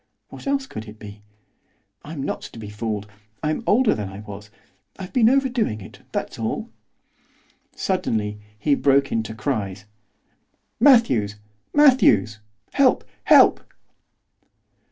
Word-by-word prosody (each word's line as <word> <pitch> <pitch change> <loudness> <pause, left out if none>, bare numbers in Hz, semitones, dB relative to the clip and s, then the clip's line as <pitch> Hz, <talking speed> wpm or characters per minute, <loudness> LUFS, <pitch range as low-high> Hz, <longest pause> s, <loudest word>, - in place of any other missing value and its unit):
What - - -10
else 275 -1 0
could 110 - -8
it 105 +1 -11
be? 105 -1 -11 0.8
I'm 150 -2 -6
not - - -3
to - - -11
be 105 -2 -8
fooled. 105 -1 -4 0.4
I'm 155 +5 -1
older 235 +2 +4
than 105 -3 -4
I 95 +1 -9
was. 105 -1 -10 0.5
I've 190 -2 -8
been 235 -4 +5
overdoing 250 - +1
it, 95 - -12
that's - - -4
all.' - - -3 1.0
Suddenly 105 -1 -2 0.2
he 145 +6 +1
broke 140 0 +2
into 110 -1 -2
cries. 105 -5 -3 0.9
'Matthews! 225 - +4 0.4
Matthews! 185 - +4 0.3
Help! 270 -2 +3 0.2
help! - - +6
115 Hz, 120 wpm, -22 LUFS, -, 1.0 s, help